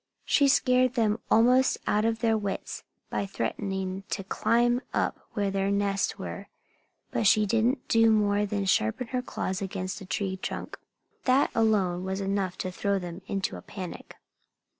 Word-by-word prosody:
She 280 Hz, -, +4 dB
scared 255 Hz, -2 st, +3 dB
them 220 Hz, -2 st, +2 dB
almost 250 Hz, +3 st, +4 dB
out 210 Hz, +1 st, +2 dB
of 225 Hz, 0 st, 0 dB
their 225 Hz, -2 st, +3 dB
wits 205 Hz, -2 st, -4 dB, 0.3 s
by 200 Hz, -, -1 dB
threatening 190 Hz, -1 st, -3 dB
to 195 Hz, -, -3 dB
climb 240 Hz, +5 st, +2 dB
up -, -, 0 dB
where 200 Hz, -2 st, 0 dB
their 195 Hz, 0 st, 0 dB
nests 200 Hz, 0 st, 0 dB
were. -, -, -6 dB, 0.6 s
But 220 Hz, -, +1 dB
she 215 Hz, +1 st, +5 dB
didn't 230 Hz, +5 st, +1 dB
do 225 Hz, 0 st, +5 dB
more 210 Hz, -1 st, +2 dB
than 200 Hz, -1 st, -2 dB
sharpen 185 Hz, -, +1 dB
her 255 Hz, -1 st, -1 dB
claws 190 Hz, -5 st, -3 dB
against 190 Hz, -1 st, -4 dB
a -, -, -8 dB
tree 190 Hz, 0 st, -2 dB
trunk. -, -, -6 dB, 0.5 s
That 260 Hz, +2 st, +3 dB
alone 195 Hz, -6 st, +2 dB
was 190 Hz, +1 st, -3 dB
enough 195 Hz, -2 st, -1 dB
to 185 Hz, -, -2 dB
throw 200 Hz, +2 st, 0 dB
them 175 Hz, 0 st, -6 dB
into 195 Hz, -2 st, -2 dB
a -, -, -9 dB
panic. 185 Hz, -4 st, -8 dB
205 Hz, 160 wpm, -27 LUFS, 190-230 Hz, 0.6 s, she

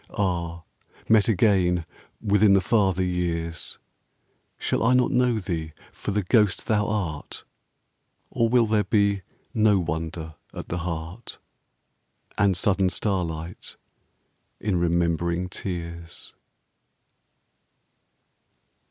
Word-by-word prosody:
Ah! 85 Hz, -4 st, -1 dB, 0.4 s
met 110 Hz, -2 st, +5 dB
again 90 Hz, -5 st, +3 dB, 0.3 s
within 105 Hz, -1 st, +4 dB
the 100 Hz, -, +6 dB
farther 95 Hz, -2 st, +2 dB
years, 85 Hz, -2 st, -2 dB, 0.8 s
Shall -, -, -1 dB
I 115 Hz, +3 st, +4 dB
not 125 Hz, -1 st, +3 dB
know 125 Hz, -2 st, +3 dB
thee 85 Hz, -6 st, -4 dB, 0.2 s
for -, -, -6 dB
the 105 Hz, 0 st, 0 dB
ghost 105 Hz, -1 st, +2 dB
thou 105 Hz, -2 st, +1 dB
art? 90 Hz, -9 st, -3 dB, 0.9 s
Or 115 Hz, -1 st, +1 dB
will 120 Hz, -1 st, +4 dB
there 105 Hz, -1 st, +2 dB
be 100 Hz, 0 st, +2 dB, 0.3 s
no 105 Hz, -2 st, +4 dB
wonder 80 Hz, -1 st, -3 dB, 0.2 s
at -, -, -7 dB
the 90 Hz, -, -2 dB
heart 85 Hz, +5 st, -5 dB, 1.0 s
And 100 Hz, -3 st, +2 dB
sudden 95 Hz, +1 st, +2 dB
starlight 85 Hz, -3 st, -3 dB, 0.8 s
in 105 Hz, -2 st, -1 dB
remembering 85 Hz, +1 st, 0 dB
tears? 85 Hz, -2 st, -6 dB
90 Hz, 100 wpm, -25 LUFS, 85-105 Hz, 1.0 s, the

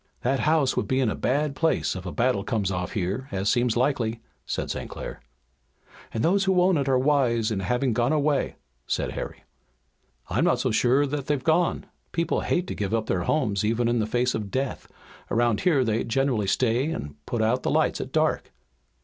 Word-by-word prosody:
"That 135 Hz, +2 st, +1 dB
house 155 Hz, -3 st, +2 dB
would -, -, -1 dB
be 130 Hz, -, +1 dB
in 125 Hz, -5 st, +2 dB
a -, -, -3 dB
bad 145 Hz, +2 st, 0 dB
place 160 Hz, -9 st, +1 dB
if 95 Hz, 0 st, -6 dB
a -, -, -3 dB
battle 120 Hz, -4 st, +1 dB
comes 105 Hz, -5 st, -1 dB
off 90 Hz, -1 st, -3 dB
here, 100 Hz, +7 st, -2 dB
as 95 Hz, +1 st, 0 dB
seems 120 Hz, -1 st, +2 dB
likely," 120 Hz, -3 st, 0 dB, 0.3 s
said -, -, -2 dB
St. -, -, -5 dB
Clair. -, -, -7 dB, 0.9 s
"And 110 Hz, -, -2 dB
those 195 Hz, +3 st, +3 dB
who 190 Hz, -1 st, +3 dB
own 180 Hz, +1 st, +4 dB
it 140 Hz, -1 st, 0 dB
are 130 Hz, -, +4 dB
wise 125 Hz, -5 st, +2 dB
in 105 Hz, -, -1 dB
having 125 Hz, +6 st, 0 dB
gone 120 Hz, +3 st, +1 dB
away," 150 Hz, -2 st, +1 dB, 0.3 s
said -, -, -1 dB
Harry. -, -, -6 dB, 0.8 s
"I'm -, -, 0 dB
not -, -, +3 dB
so -, -, 0 dB
sure 125 Hz, +6 st, +3 dB
that 140 Hz, -1 st, -4 dB
they've 145 Hz, -3 st, 0 dB
gone. 165 Hz, +2 st, +2 dB, 0.3 s
People 170 Hz, 0 st, 0 dB
hate 180 Hz, 0 st, 0 dB
to -, -, -5 dB
give 105 Hz, +1 st, -1 dB
up 110 Hz, -1 st, -1 dB
their 90 Hz, -2 st, -1 dB
homes 105 Hz, -10 st, +1 dB
even 115 Hz, +2 st, +1 dB
in 120 Hz, 0 st, +1 dB
the 110 Hz, -, 0 dB
face 125 Hz, +2 st, +1 dB
of 105 Hz, -2 st, -3 dB
death. 130 Hz, +4 st, -3 dB, 0.4 s
Around 120 Hz, -2 st, +2 dB
here 150 Hz, -8 st, +3 dB
they 115 Hz, -1 st, 0 dB
generally 120 Hz, -4 st, 0 dB
stay 125 Hz, +7 st, +1 dB
and 75 Hz, -, -5 dB
put 115 Hz, -2 st, -1 dB
out 120 Hz, +4 st, +1 dB
the -, -, -1 dB
lights -, -, +1 dB
at -, -, -6 dB
dark." -, -, 0 dB
125 Hz, 205 wpm, -25 LUFS, 110-140 Hz, 0.9 s, own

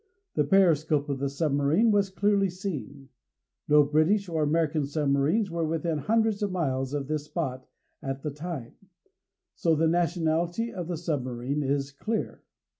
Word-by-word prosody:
The 150 Hz, -, +2 dB
periscope 155 Hz, -4 st, +3 dB
of 140 Hz, -1 st, -2 dB
the 140 Hz, 0 st, -1 dB
submarine 145 Hz, +8 st, +2 dB
was 200 Hz, -2 st, +2 dB
clearly 200 Hz, 0 st, +2 dB
seen. 150 Hz, -7 st, -6 dB, 0.6 s
No 150 Hz, 0 st, +6 dB
British 155 Hz, +8 st, +2 dB
or 165 Hz, -2 st, -1 dB
American 155 Hz, -1 st, +1 dB
submarines 150 Hz, +7 st, +1 dB
were 170 Hz, 0 st, -1 dB
within 160 Hz, 0 st, -1 dB
hundreds 220 Hz, +5 st, +1 dB
of 205 Hz, -2 st, 0 dB
miles 135 Hz, -6 st, -1 dB
of 140 Hz, -2 st, -2 dB
this 150 Hz, -1 st, -2 dB
spot 130 Hz, -6 st, -4 dB, 0.3 s
at 135 Hz, 0 st, -5 dB
the 150 Hz, -, -2 dB
time, 150 Hz, -4 st, -6 dB, 0.8 s
so 165 Hz, -3 st, +1 dB
the 160 Hz, +1 st, +2 dB
nationality 175 Hz, +5 st, 0 dB
of 180 Hz, -4 st, -5 dB
the 175 Hz, -2 st, -3 dB
submarine 135 Hz, -3 st, -2 dB
is 140 Hz, 0 st, -1 dB
clear. 215 Hz, +10 st, -3 dB
155 Hz, 150 wpm, -27 LUFS, 140-180 Hz, 0.8 s, No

